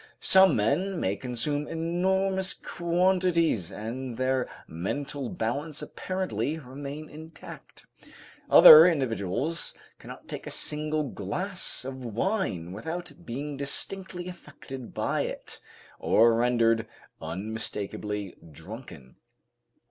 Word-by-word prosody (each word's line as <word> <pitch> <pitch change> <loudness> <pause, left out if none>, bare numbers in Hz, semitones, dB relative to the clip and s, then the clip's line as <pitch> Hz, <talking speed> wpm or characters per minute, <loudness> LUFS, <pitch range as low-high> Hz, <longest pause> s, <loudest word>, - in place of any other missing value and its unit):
Some 190 -1 +6
men 165 - +1
may 95 - 0
consume 130 +6 -1
enormous 190 +3 0
quantities 170 - +1
and 115 +4 -5
their 130 0 0 0.2
mental 135 - -4
balance 140 +7 -3
apparently 185 -4 -3
remain 140 +2 -7
intact. 160 +2 -11 0.6
Other 155 +3 +11
individuals 130 - -1 0.2
cannot - - -11
take - - -7
a - - -3
single 150 0 -1
glass 150 - -3
of 130 -1 -6
wine 110 - -2
without 160 - -5
being 140 +4 -5
distinctly 180 +5 -5
affected 145 -7 -9
by - - 0
it, - - -6 0.4
or 115 +1 +5
rendered 115 -1 +2 0.3
unmistakably 105 +2 -4 0.2
drunken. 80 - -11
140 Hz, 95 wpm, -27 LUFS, 115-170 Hz, 0.6 s, Other